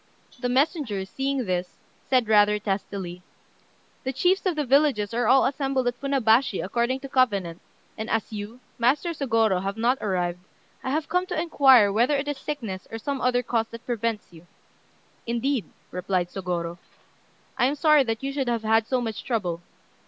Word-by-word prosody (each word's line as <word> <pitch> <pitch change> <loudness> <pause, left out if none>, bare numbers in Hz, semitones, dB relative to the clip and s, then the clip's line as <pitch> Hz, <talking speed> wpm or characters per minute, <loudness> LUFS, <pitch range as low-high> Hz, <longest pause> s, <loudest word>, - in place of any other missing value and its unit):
The 245 0 -1
messenger, 260 - 0
seeing 270 +5 -2
this, 180 -1 -3 0.3
said 255 -4 +3
rather 210 -1 +5
testily 195 -3 -4 0.8
"The 260 - -1
chiefs 365 +8 +1
of 360 - 0
the 300 -1 -1
villages 265 -6 +2
are 240 -1 +1
all 265 +3 +5
assembled 270 -1 0
at 245 0 0
Funabashi 255 -5 +2
according 240 +6 -1
to 275 - -6
covenant, 200 -11 +1 0.3
and 220 0 -5
as 225 0 -1
you, 210 +4 -7 0.2
Master 270 +9 +2
Sôgorô, 225 - +1
have 195 +2 -3
not 245 +4 +1
arrived, 180 -3 -1 0.4
I - - -3
have 305 +3 -1
come 360 +2 0
to - - -2
inquire 265 -10 +5
whether 240 +7 +3
it 280 +1 -3
is 290 -1 -3
sickness 225 -11 -5
or 225 - -5
some 275 +4 -3
other 250 0 +2
cause 225 -1 0
that 230 0 -11
prevents 230 -5 -3
you." 165 +1 -15 0.8
"Indeed," 240 +1 0 0.3
replied 180 -1 -1
Sôgorô, 175 -3 -4 0.8
"I 255 -1 +3
am 280 - -1
sorry 305 -1 +5
that 225 0 -3
you 275 0 -2
should 270 -2 -2
have 235 -2 -1
had 220 0 +2
so 255 -1 0
much 225 -2 -4
trouble. 180 -9 -2
235 Hz, 175 wpm, -25 LUFS, 205-270 Hz, 0.8 s, rather